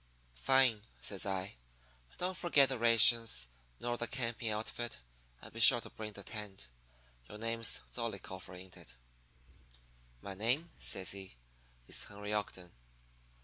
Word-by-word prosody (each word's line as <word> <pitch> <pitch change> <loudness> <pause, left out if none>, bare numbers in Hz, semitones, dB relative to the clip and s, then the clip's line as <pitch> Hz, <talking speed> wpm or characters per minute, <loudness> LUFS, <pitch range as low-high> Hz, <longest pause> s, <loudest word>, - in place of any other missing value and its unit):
"'Fine,' 115 - +2
says 100 -1 -3
I. 95 -6 -3 0.5
'And - - -22
don't 185 +1 -2
forget 145 -7 +4
the 130 -3 -3
rations. 115 - +6 0.3
Nor 120 0 -2
the 120 - -1
camping 115 -3 -3
outfit. 110 +2 -4 0.5
And - - -11
be 115 - -7
sure 120 +2 +8
to - - -10
bring 110 -1 -7
the 100 - -10
tent. 100 - -8 0.6
Your 105 - -9
name's 115 0 -1
Zollicoffer, 95 -5 -6
ain't 90 0 -11
it?" - - -12 1.3
"'My 100 - -6
name,' 125 - -1
says 95 -1 0
he, 95 -7 -8 0.5
'is - - -4
Henry 105 0 -7
Ogden.' 95 -4 -4
110 Hz, 140 wpm, -34 LUFS, 95-120 Hz, 1.3 s, sure